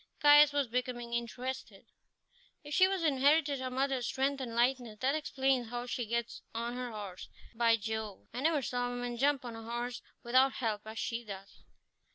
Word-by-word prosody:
Caius 295 0 +8
was 285 -1 +1
becoming 240 0 -3
interested. 245 +2 -4 0.8
"If 295 0 -7
she 370 - +6
has 380 -2 0
inherited 285 0 +3
her 260 0 -3
mother's 265 -1 0
strength 275 +1 0
and 235 -3 -5
lightness, 240 -2 +1
that 265 +2 +2
explains 265 -5 0
how 240 0 -4
she 245 -2 -3
gets 235 +1 -2
on 235 +1 -2
her 250 0 -4
horse. 205 -4 -7 0.2
By 230 0 +4
Jove! 220 -1 -5
I 250 - -3
never 305 -2 +2
saw 245 0 -1
a - - -3
woman 245 0 -3
jump 280 0 +2
on 235 -2 -6
a 225 - -8
horse 240 +2 -4 0.2
without 260 +3 +4
help 220 -3 -2
as 220 +1 -7
she 230 +1 -2
does." 200 -2 -10
245 Hz, 185 wpm, -32 LUFS, 235-270 Hz, 0.8 s, Caius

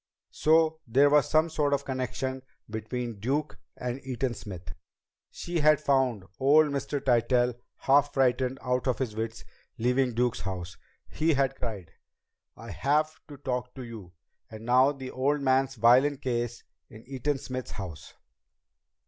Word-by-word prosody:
So 160 0 +3
there 140 +5 +4
was 150 -3 +4
some 155 +1 +4
sort 150 -3 0
of 140 - -5
connection 130 0 -3 0.3
between 110 +1 -5
Duke 140 +8 -2 0.2
and 125 +2 -4
Eaton 130 -1 -2
Smith! 90 -7 -8 0.6
She 175 -1 -4
had 150 -1 +5
found 130 -9 +1
old 150 +3 +5
Mr. 140 +1 -2
Tytell 125 -1 +2 0.2
half 145 +1 +3
frightened 130 0 +2
out 125 +1 0
of 130 - +1
his 120 -5 -3
wits 115 +1 -4 0.3
leaving 125 +1 +1
Duke's 120 0 +1
house. 90 -3 -5 0.3
He 160 0 +1
had 135 -1 +1
cried: 105 -9 -6 0.7
"I - - -9
have 150 +3 +1 0.2
to 145 - -10
talk 125 -2 -4
to 130 - -7
you!" 110 -7 -10 0.4
And 110 0 -10
now 130 +3 +5
the 130 -2 -7
old 140 +3 +1
man's 135 0 +2
violin 125 +5 +5
case 120 -2 -3 0.3
in 110 +1 -13
Eaton 135 +2 -2
Smith's 130 -2 -6
house! 90 -7 -8
130 Hz, 150 wpm, -28 LUFS, 120-140 Hz, 0.7 s, had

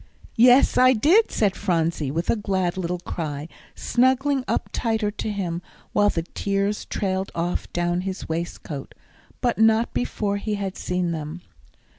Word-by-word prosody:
"Yes, 250 +3 +6
I 255 0 +7
did," 330 - +4
said 200 -3 +1
Phronsie, 165 -6 0
with 165 +5 0
a - - +2
glad 190 -4 -1
little 180 -1 -2
cry, 155 -4 -5 0.3
snuggling 260 +2 +2
up - - -1
tighter 220 -3 0
to 215 - -4
him, 175 -4 -3 0.3
while 205 0 +4
the 165 -4 -2
tears 200 +3 -2
trailed 190 -1 -2
off 175 +1 -2
down 175 0 0
his 190 0 -5
waistcoat, 160 -3 -5 0.5
but 240 -3 0
not 225 +1 +4
before 205 -4 -1
he 210 +1 -2
had 195 -2 -4
seen 180 -1 -1
them. 160 +1 -5
195 Hz, 150 wpm, -24 LUFS, 175-220 Hz, 0.5 s, I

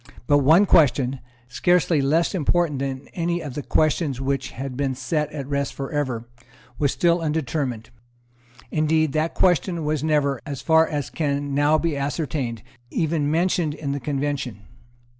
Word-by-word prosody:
But 145 +2 +4
one 160 +8 +5
question, 135 -6 +3 0.3
scarcely 165 +4 +2
less 160 +7 +2
important 170 -3 +1
than 135 -1 -4
any 170 0 -1
of 150 -6 -6
the 145 - -4
questions 155 -2 +1
which 135 -1 -1
had 130 +1 -6
been 135 -1 -1
set 150 +3 -2
at 145 -3 -5
rest 140 0 -2
for 135 -1 -5
ever, 130 -6 -2 0.5
was 145 -2 +2
still 170 0 +2
undetermined. 140 -7 -2 0.8
Indeed, 155 -1 +1
that 155 +2 0
question 175 -2 +2
was 150 -1 -1
never, 145 -4 +1
as 140 -4 -6
far 160 0 +4
as 145 -4 -3
can 145 -2 -2
now 145 +2 +3
be 165 -2 -1
ascertained, 140 -5 -3 0.3
even 155 -1 0
mentioned 165 -1 +1
in 140 -3 -4
the 140 - -2
Convention. 140 -4 -3
145 Hz, 155 wpm, -23 LUFS, 135-160 Hz, 0.8 s, one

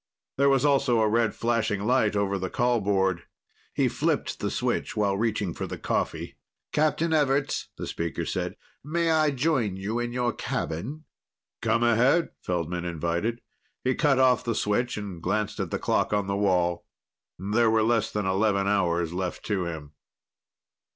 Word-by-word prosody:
There 140 +1 +4
was 135 0 +3
also 135 -4 +3
a 110 - +3
red 115 0 +1
flashing 115 -4 0
light 115 -4 +2
over 100 -1 0
the 95 0 -3
call 120 0 +1
board. 95 -3 0 0.4
He - - +1
flipped - - -1
the - - -1
switch - - -2
while 100 -2 +2
reaching 105 -4 -1
for - - -5
the - - -6
coffee. - - -2 0.3
"Captain 155 +2 +1
Everts," 140 -2 +1
the - - -4
speaker 85 -1 -3
said. - - -3 0.3
"May 165 +3 0
I 155 -1 +4
join 135 - 0
you 105 +5 -2
in 120 0 -2
your 120 -1 0
cabin?" 120 - -4 0.6
"Come 115 +1 +2
ahead," 125 +8 +3
Feldman 85 0 -2
invited. 85 +7 -2 0.4
He 130 - +2
cut 140 -1 +2
off 130 -2 +4
the 115 -2 -1
switch 120 +4 0
and 100 -5 -6
glanced 105 +4 -1
at 95 -4 -2
the - - -1
clock - - 0
on 105 -1 +1
the 100 0 -1
wall. 90 -4 +1 0.5
There 110 +5 +2
were 110 0 +3
less 115 0 +2
than 105 -2 -2
eleven 100 +1 +1
hours 85 -4 +1
left 90 0 -4
to 100 -4 -1
him. 80 -3 -6
110 Hz, 165 wpm, -26 LUFS, 95-125 Hz, 0.6 s, There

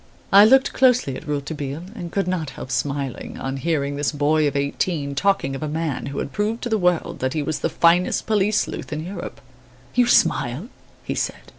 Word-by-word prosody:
I 200 +1 +9
looked 265 +4 +5
closely 250 - +3
at 155 - -9
Rouletabille 145 +1 -4
and 170 -1 -7
could 195 -1 -1
not 175 -5 -1
help 130 - -8
smiling, 140 +1 -3
on 135 +1 -4
hearing 145 -2 -1
this 145 - 0
boy 150 +1 +2
of 140 - -2
eighteen 140 +1 -1
talking 180 -3 +1
of 135 - -6
a 155 - -2
man 150 -3 -3
who 140 0 -6
had - - -3
proved 215 - -2
to 240 - -2
the 220 -1 +1
world 180 -2 0
that 130 +1 -1
he 155 - -1
was 155 +1 -2
the - - 0
finest 170 +2 +3
police 210 -1 +2
sleuth - - -6
in 155 +1 -4
Europe. 175 -8 -7 0.5
"You 245 -1 +3
smile," 165 - +2 0.3
he - - -3
said? - - -2
155 Hz, 200 wpm, -22 LUFS, 140-190 Hz, 0.5 s, I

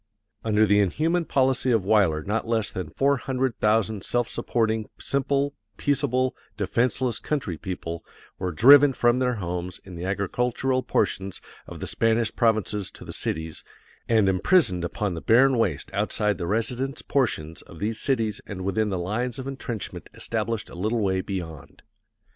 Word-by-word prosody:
Under 110 -1 +3
the 105 0 +4
inhuman 160 - +1
policy 130 -2 +1
of 115 -6 +2
Weyler 95 -7 +3
not 110 +3 -2
less 115 -3 0
than 90 -4 -5
four 140 - +2
hundred 130 0 -2
thousand 110 -1 +1
self 120 -1 0
supporting, 110 -2 -1
simple, 140 +1 0 0.2
peaceable, 130 -2 +1 0.2
defenseless 120 +3 0
country 135 - -2
people 85 -1 -5 0.4
were 90 -1 -2
driven 140 - +7
from 120 0 +2
their 125 -1 +1
homes 90 -2 -4
in 95 - -10
the 85 0 -6
agricultural 125 +7 0
portions 95 -6 -1 0.3
of - - -9
the - - -4
Spanish 115 0 +1
provinces 110 -3 +1
to - - -13
the - - -7
cities, 80 0 -4 0.5
and 110 -4 +4
imprisoned 95 - +3
upon 100 +2 -2
the 80 - -5
barren 130 +3 +5
waste 95 - -1
outside 105 -3 0
the 85 - -3
residence 125 - 0
portions 80 - -1
of 85 - -14
these 110 +5 -2
cities 115 -6 0
and 95 -3 -6
within 105 +2 0
the 95 - -1
lines 110 +7 -2
of 130 - -6
intrenchment 130 -5 -6
established 115 -1 -2
a - - -11
little 110 +7 -1
way 95 -2 +1
beyond. 85 -6 -7
110 Hz, 160 wpm, -25 LUFS, 95-125 Hz, 0.5 s, driven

